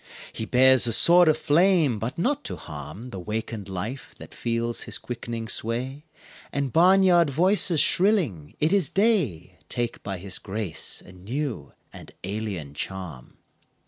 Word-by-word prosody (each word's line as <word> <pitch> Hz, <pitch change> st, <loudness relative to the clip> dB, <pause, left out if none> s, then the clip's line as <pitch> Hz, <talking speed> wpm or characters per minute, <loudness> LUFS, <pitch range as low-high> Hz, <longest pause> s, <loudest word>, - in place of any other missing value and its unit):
He 110 Hz, -, -4 dB
bears 130 Hz, 0 st, +4 dB
a 115 Hz, -, +1 dB
sword 175 Hz, +7 st, +7 dB
of 155 Hz, -1 st, +4 dB
flame 160 Hz, -, +2 dB
but 115 Hz, +4 st, -5 dB
not 280 Hz, +11 st, -1 dB
to -, -, -3 dB
harm 80 Hz, -, -9 dB
The 95 Hz, -, -6 dB
wakened 105 Hz, +1 st, -5 dB
life 105 Hz, +8 st, -6 dB
that -, -, -12 dB
feels 115 Hz, 0 st, -2 dB
his -, -, -1 dB
quickening 115 Hz, -1 st, -6 dB
sway 130 Hz, +7 st, -2 dB, 0.5 s
And 140 Hz, -3 st, -3 dB
barnyard 180 Hz, -1 st, +5 dB
voices 175 Hz, +2 st, +2 dB
shrilling 160 Hz, -, +1 dB
"It 155 Hz, +5 st, +1 dB
is 195 Hz, -7 st, +2 dB
day!" 190 Hz, -, 0 dB
Take 120 Hz, -1 st, -3 dB
by 100 Hz, -2 st, -5 dB
his 95 Hz, +2 st, -3 dB
grace 100 Hz, -4 st, 0 dB
a -, -, -13 dB
new 110 Hz, -, -5 dB, 0.2 s
and -, -, -12 dB
alien 95 Hz, -7 st, -5 dB
charm. 85 Hz, -5 st, -7 dB
120 Hz, 145 wpm, -25 LUFS, 100-165 Hz, 0.5 s, sword